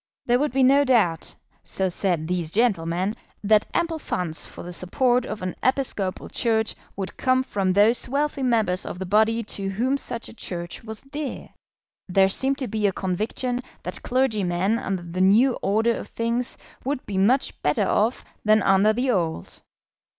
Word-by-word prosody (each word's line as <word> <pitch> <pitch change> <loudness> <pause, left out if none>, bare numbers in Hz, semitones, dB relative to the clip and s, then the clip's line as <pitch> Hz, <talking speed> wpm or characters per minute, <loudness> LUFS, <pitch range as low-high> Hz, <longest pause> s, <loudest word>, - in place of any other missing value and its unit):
There 245 +1 +3
would 295 -1 0
be 265 +1 +2
no 275 +2 +6
doubt, 215 - +1 0.3
so 190 - -1
said 175 -3 0
these 175 -2 -1
gentlemen, 190 -2 +1 0.3
that 210 +1 +4
ample 335 -2 -1
funds 170 - -3
for - - -10
the 175 - -7
support 245 +8 +1
of 205 - -5
an 185 - -3
Episcopal 250 -8 -1
Church 220 -2 0 0.2
would 195 -1 -5
come 255 0 +2
from 195 -7 0
those 215 +6 +3
wealthy 285 +1 -1
members 220 -8 +1
of - - -6
the 190 - -4
body 220 +4 +2
to 200 -2 -4
whom 245 +8 0
such 240 -4 -4
a - - -11
Church 175 -5 -6
was 220 -1 -7
dear. 285 0 -6 0.6
There 190 +1 +4
seemed 270 +7 0
to 265 -4 -3
be 215 -2 0
a - - +2
conviction 215 +7 -2 0.2
that - - -6
clergymen 215 -5 +1
under 190 -7 -3
the 175 +2 -4
new 220 +8 +5
order 220 +4 +2
of - - -6
things 235 +2 -2 0.3
would 270 0 -3
be 195 -2 -2
much 245 +8 +2
better 150 0 +1
off 225 +4 +1 0.2
than 215 -1 +4
under 195 +2 +4
the 250 +3 +1
old. 165 - -2
215 Hz, 170 wpm, -24 LUFS, 185-250 Hz, 0.6 s, no